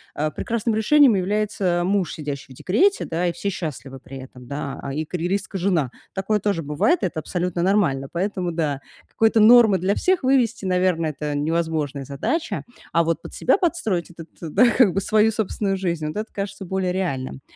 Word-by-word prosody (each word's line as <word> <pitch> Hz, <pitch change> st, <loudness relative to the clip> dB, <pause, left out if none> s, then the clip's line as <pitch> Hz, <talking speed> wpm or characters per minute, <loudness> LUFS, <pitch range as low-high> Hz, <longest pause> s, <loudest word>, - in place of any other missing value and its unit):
а, 155 Hz, +1 st, -1 dB
прекрасным 230 Hz, +4 st, -2 dB
решением 260 Hz, +4 st, +5 dB
является 190 Hz, -2 st, 0 dB
муж, 195 Hz, -1 st, 0 dB
сидящий 145 Hz, -3 st, -6 dB
в -, -, -17 dB
декрете, 380 Hz, -, +2 dB
да, 170 Hz, +2 st, -1 dB
и 175 Hz, -, +1 dB
все 200 Hz, -, -3 dB
счастливы 145 Hz, -6 st, -6 dB
при 135 Hz, +1 st, -10 dB
этом, 130 Hz, -1 st, -12 dB
да, 140 Hz, 0 st, -5 dB
и 155 Hz, +3 st, -3 dB
карьеристка 185 Hz, +4 st, -3 dB
жена. 170 Hz, -8 st, +1 dB, 0.2 s
Такое 200 Hz, +2 st, 0 dB
тоже 200 Hz, -5 st, -1 dB
бывает, 150 Hz, -, +1 dB
это 175 Hz, -4 st, -1 dB
абсолютно 175 Hz, +2 st, -2 dB
нормально. 170 Hz, -8 st, +1 dB
Поэтому, 185 Hz, 0 st, -2 dB
да, 150 Hz, -5 st, -2 dB, 0.3 s
какой-то 225 Hz, 0 st, +2 dB
нормы 220 Hz, -2 st, +7 dB
для 185 Hz, +3 st, +1 dB
всех 370 Hz, -, +1 dB
вывести, 250 Hz, -6 st, +2 dB
наверно, 180 Hz, -2 st, +1 dB
это 150 Hz, 0 st, -3 dB
невозможная 155 Hz, -3 st, -1 dB
задача, 145 Hz, -, -2 dB, 0.3 s
а 170 Hz, -, +3 dB
вот 165 Hz, 0 st, -1 dB
под -, -, -10 dB
себя 260 Hz, -, +3 dB
подстроить 225 Hz, -, -1 dB
этот, 170 Hz, -1 st, -12 dB
да 170 Hz, +9 st, +3 dB
как 235 Hz, -5 st, +4 dB
бы, 195 Hz, -, +1 dB
свою 215 Hz, +2 st, +3 dB
собственную 205 Hz, -2 st, -1 dB
жизнь, 170 Hz, -5 st, -2 dB
вот 155 Hz, -, -5 dB
это 215 Hz, +1 st, -5 dB
кажется 195 Hz, 0 st, -5 dB
более 185 Hz, 0 st, -1 dB
реальным. 135 Hz, -9 st, -3 dB
180 Hz, 180 wpm, -22 LUFS, 155-210 Hz, 0.3 s, нормы